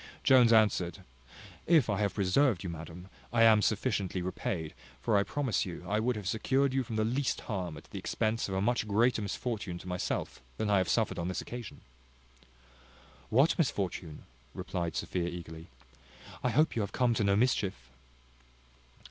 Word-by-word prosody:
Jones 125 -3 +6
answered, 105 -6 +2 0.6
"If 160 -7 +5
I 105 -2 0
have 100 -2 0
preserved 100 +2 +2
you, 90 - -4
madam, 85 +2 -9 0.2
I 115 0 +4
am 110 -2 +6
sufficiently 100 -5 0
repaid; 90 -3 -3 0.3
for 105 - 0
I 100 - +5
promise 130 +3 -1
you, 90 -1 -7
I 105 +3 +1
would 120 +2 0
have 105 -3 -5
secured 130 +6 +1
you 135 - +2
from 115 -3 -5
the 110 0 +1
least 125 +4 -1
harm 90 -7 -4
at - - -11
the - - -8
expense 110 -1 -1
of 95 - -3
a 95 - 0
much 120 +1 0
greater 115 +3 +2
misfortune 100 -3 -3
to 90 - -11
myself 90 -6 -3 0.2
than 105 -1 -1
I 100 - +5
have 95 - -1
suffered - - +1
on 85 - -2
this 90 - -2
occasion." 120 -3 -8 1.5
"What 135 +9 +4
misfortune?" 95 - -2 0.3
replied 90 -3 -3
Sophia 90 -2 -2
eagerly; 85 -1 -8 0.8
"I 125 - +2
hope 155 +6 +2
you 115 - 0
have 100 -2 -4
come 125 -2 +2
to 110 - 0
no 100 -1 +3
mischief?" 100 - 0
105 Hz, 175 wpm, -31 LUFS, 90-120 Hz, 1.5 s, Jones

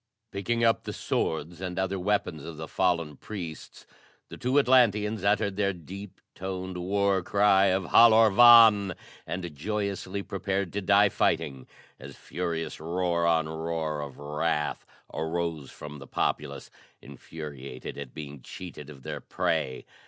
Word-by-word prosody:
Picking 115 +4 -1
up 115 -1 +3
the - - -4
swords 80 +2 -2
and 90 -1 -4
other 95 0 -1
weapons 90 -6 -1
of 80 -2 -8
the 80 0 -6
fallen 85 -6 0
priests 85 -7 -8 0.4
the - - -9
two 130 +3 0
Atlanteans 110 -6 +3
uttered 100 -1 +1
their 100 -1 +1
deep 95 +3 -10
toned 95 0 -5
war 100 +2 +1
cry 100 +1 +4
of 95 0 +2
Halor 110 +3 +6
vàn! 110 -4 +7 0.3
and 85 -3 -5
joyously 100 +2 -3
prepared 100 -1 -3
to 105 - -2
die 100 +1 +5
fighting, 70 -10 -1 0.3
as - - -10
furious 85 -2 -4
roar 85 +1 0
on 80 -2 +2
roar 80 -1 -3
of 70 -3 -8
wrath 75 +1 -2 0.3
arose 80 -3 -3
from 75 -1 -10
the 70 - -11
populace, 70 +2 -2 0.3
infuriated 70 -2 -9
at 70 -3 -8
being 70 -3 -8
cheated 75 +1 -9
of 70 -3 -12
their - - -5
prey. 65 -1 -2
90 Hz, 140 wpm, -27 LUFS, 80-100 Hz, 0.4 s, vàn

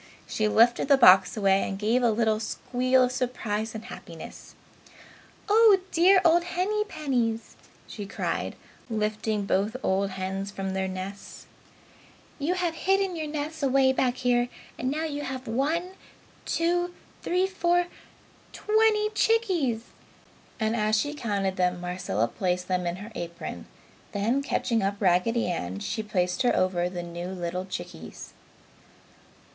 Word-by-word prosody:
She 215 - 0
lifted 235 +4 +4
the 280 -1 +6
box 190 -4 +7
away 195 -1 +3
and 195 - -3
gave 220 +5 +1
a 240 - +4
little 220 -1 +1
squeal 255 +3 +1
of 250 - +1
surprise 230 -4 -2
and 220 - -7
happiness. - - -10 0.9
"Oh 430 -1 +6
you 370 - -15
dear 370 +3 +6
old 340 +1 +6
Hennypennies!" 310 - -1 0.3
she 205 -2 -7
cried, - - -3 0.3
lifting 215 -1 -1
both 200 +4 0
old 195 +1 +1
hens 190 +1 -4
from 195 -1 -4
their 190 0 -1
nests. 190 +2 -7 0.9
"You 320 +6 0
have 355 -3 -1
hidden 385 +2 +1
your 315 -2 -3
nests 305 +1 -4
away 265 -1 +3
back 255 -1 +1
here 245 -1 +1 0.3
and 255 - -1
now 305 +4 -2
you 290 -2 -3
have 260 -2 -5
one, 305 +10 0 0.5
two, 350 +1 0 0.3
three, 365 +2 +1
four 355 -2 +1 0.7
twenty 425 0 +2
chickies!" 370 - +1 0.8
and 220 0 0
as 215 -1 +2
she 290 +6 -1
counted 200 -8 -2
them, 180 -1 +1
Marcella 175 - -1
placed 180 - -2
them 180 -1 0
in 175 - -1
her 205 +5 -9
apron; 170 - -6 0.5
then 225 +7 +1
catching 235 -4 0
up 200 +1 -1
Raggedy 200 +5 +2
Ann, 95 - -3
she 220 - -3
placed 185 -1 -1
her 245 - +3
over 180 -1 +1
the 175 -1 -5
new 175 +1 -6
little 180 0 -4
chickies. 175 - -8
225 Hz, 140 wpm, -27 LUFS, 190-300 Hz, 0.9 s, box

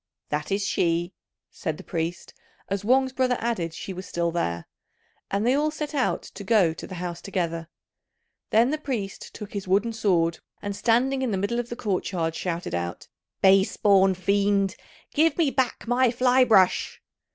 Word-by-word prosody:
"That 150 +3 -2
is 200 +1 0
she," 175 -2 0 0.4
said 155 -1 -4
the - - -10
priest, 165 +1 -4 0.4
as 200 0 -2
Wang's 260 +3 +3
brother 255 -2 +1
added 220 -8 -1
she 195 - -6
was 185 +1 -8
still 170 0 -1
there; 85 - -2 0.6
and 200 +2 0
they 250 - +4
all 295 +2 +2
set 305 -1 -5
out 275 -3 0
to 200 - -10
go 195 -6 +3
to - - -9
the 185 - -7
house 175 -1 -5
together. 170 -4 -3 0.8
Then 230 +4 +4
the 305 - -1
priest 230 -10 -4
took 210 - -8
his 200 -2 -4
wooden 205 +5 +2
sword, 175 -7 +1 0.2
and 200 -1 -4
standing 255 +5 +2
in 260 - 0
the 200 - 0
middle 205 +5 -1
of 240 0 -4
the 240 - -4
court 200 -6 -2
yard, 165 -3 -1
shouted 170 +1 -3
out, 85 0 -4 0.3
"Base 195 0 +5
born 195 -2 +4
fiend, 200 +1 +1 0.4
give 315 0 +3
me 320 -5 +2
back 260 -3 -1
my 245 +1 +3
fly 250 +2 +4
brush!" 195 -6 +3
200 Hz, 180 wpm, -25 LUFS, 175-245 Hz, 0.8 s, Base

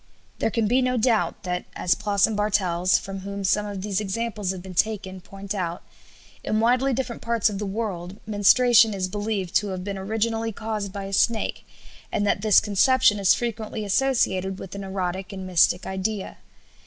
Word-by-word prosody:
There - - +1
can 225 -1 0
be 250 +4 +3
no 255 0 +1
doubt 220 -7 +1
that 180 -1 -3
as 175 - +2
Ploss 200 +3 +2
and 220 - -2
Bartels, 185 -4 +2
from 195 +1 -6
whom 200 +1 -6
some 210 +2 +1
of 200 -2 -6
these 205 -1 -1
examples 210 0 -3
have 185 -2 -3
been 190 -1 -9
taken, 190 -1 -1
point 195 +2 -7
out 175 -4 -3 0.6
in 215 - 0
widely 250 +4 +3
different 250 -2 -3
parts 230 -2 +1
of 195 - -5
the 210 - -3
world 195 -3 -4
menstruation 220 +2 +5
is 185 -1 -1
believed 205 -2 -3
to 210 - -1
have 185 -2 -4
been 200 0 -4
originally 225 +3 -1
caused 215 -2 -4
by 200 +1 -6
a 195 0 -6
snake, 225 +2 0 0.4
and 205 - 0
that 200 - +1
this 215 -1 +6
conception 210 +1 +3
is 195 -2 +5
frequently 220 -2 -4
associated 195 -5 +1
with 190 - -9
an 200 0 -6
erotic 190 0 -3
and 190 -1 -7
mystic 180 0 +3
idea. 190 +1 -3
205 Hz, 185 wpm, -24 LUFS, 190-220 Hz, 0.6 s, this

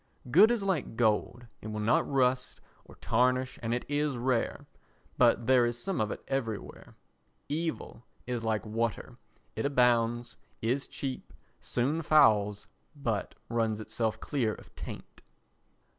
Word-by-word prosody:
Good 195 - +8
is 235 -4 0
like 180 -12 -1
gold, 120 +2 +1 0.2
it - - -7
will 110 0 -4
not 110 +6 +2
rust 130 -1 +1 0.3
or - - -15
tarnish 125 +2 +1
and 115 -1 -2
it 120 +1 -1
is 145 -2 0
rare, 120 -1 -1 0.5
but 120 - +4
there 130 -1 +5
is 120 0 0
some 185 - -2
of 110 - 0
it - - -6
everywhere. 115 -6 -4 0.5
Evil 160 -5 -3 0.2
is 120 -2 -3
like 110 -1 -1
water, 115 +2 -3 0.4
it - - -2
abounds, 120 -3 +2 0.2
is 125 +5 -1
cheap, 135 -2 -5 0.3
soon 140 +7 -1
fouls, 105 -10 +4 0.3
but 115 -8 -2
runs 115 -2 0
itself 110 0 -2
clear 120 -7 -1
of - - -16
taint. - - -9
120 Hz, 140 wpm, -30 LUFS, 115-135 Hz, 0.5 s, Good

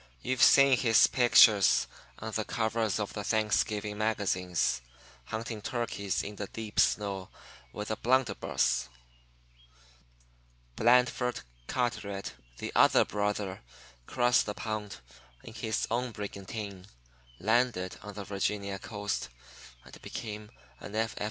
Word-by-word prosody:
You've 130 0 -1
seen 135 -3 +7
his 115 -3 +6
picture 115 -4 +6 0.6
on 110 0 -6
the 110 0 -1
covers 110 -2 -1
of 105 - -3
the 105 - -4
Thanksgiving 105 -1 0
magazines, 90 - 0 0.4
hunting 110 0 -5
turkeys 115 -6 -2
in 105 0 -7
the 105 - -4
deep 110 0 -5
snow 100 -3 +1 0.4
with 105 - -5
a - - 0
blunderbuss. 120 - +1 1.9
Blandford 125 +1 +3 0.3
Carteret, 100 -5 -2 0.2
the - - -5
other - - +5
brother, 105 -1 -2 0.5
crossed 120 -2 +2
the 105 - -3
pond 110 -2 -4 0.5
in 115 - -10
his 110 -1 -2
own 125 +2 0
brigantine, 100 -2 -7 0.5
landed 110 -3 +1
on 105 -1 -9
the 105 - -5
Virginia 100 0 -2
coast, 105 - -4 0.6
and - - -14
became 105 -1 -7 0.3
an 100 - -9
F. 115 +1 -1
105 Hz, 115 wpm, -30 LUFS, 100-115 Hz, 1.9 s, seen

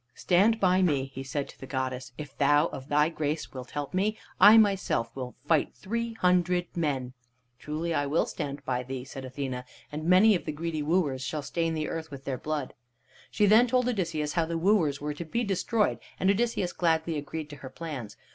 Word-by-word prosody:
"Stand 205 +5 +3
by 185 0 +3
me!" 140 -6 +1
he 135 - -6
said 135 +1 -3
to - - -14
the 135 - -9
goddess. 130 -1 -3
"If 145 -3 -8
thou 145 +2 +4
of 135 0 -8
thy 150 +1 +4
grace 155 -2 -3
wilt 130 -2 -7
help 145 +1 -5
me, 205 +4 +1 0.2
I 210 +4 +9
myself 195 - +2
will 125 -2 -6
fight 155 -1 +2
three 230 +3 -3
hundred 180 -3 +1
men." 135 -7 -1 0.5
"Truly 160 +3 -3
I 145 -2 0
will 150 +4 +2
stand 140 -1 -5
by 125 -1 0
thee," 130 0 -6
said 135 0 -8
Athene, 130 -1 -4 0.3
"and 150 +1 -5
many 185 +5 +6
of 180 - -1
the - - -2
greedy 160 0 -3
wooers 150 -4 +1
shall 150 +2 -3
stain 165 +3 -1
the 155 -1 -2
earth 160 -1 -5
with 140 -2 -10
their 130 -3 -3
blood." 150 -3 -3 0.6
She 210 - +2
then 220 +5 +6
told 250 0 +2
Odysseus 165 -10 -1
how 170 -2 +2
the 165 0 -2
wooers 165 -6 +2
were 150 +1 -3
to 160 - -6
be 235 +9 -2
destroyed, 210 +2 0 0.2
and 190 - +4
Odysseus 200 -4 0
gladly 165 -1 +1
agreed 150 +1 -5
to 145 - -9
her 130 -1 -9
plans. 135 -6 -7
155 Hz, 205 wpm, -28 LUFS, 140-185 Hz, 0.6 s, I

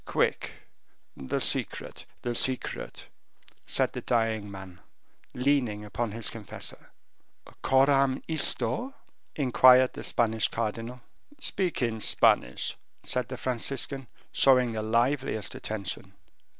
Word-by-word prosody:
"Quick, - - 0 0.6
the 65 -1 -3
secret, - - -1 0.2
the 120 - -1
secret!" 130 +2 -2 0.6
said - - +2
the - - -5
dying 110 -3 0
man, 95 -2 -10 0.6
leaning 125 -6 +1
upon 115 +2 -3
his 115 +1 -3
confessor. 110 -3 -6 0.7
"Coram 135 0 +3
isto?" 245 - 0 0.4
inquired 130 -2 +6
the - - -7
Spanish 110 -2 +1
cardinal. 115 +2 -4 0.4
"Speak 185 - -1
in 115 -2 -1
Spanish," 65 - +3 0.3
said 125 -2 0
the 130 - -6
Franciscan, 130 +2 -2 0.2
showing 125 -3 +4
the 110 -1 -3
liveliest 115 0 0
attention. 95 -2 -5
120 Hz, 105 wpm, -28 LUFS, 110-130 Hz, 0.7 s, inquired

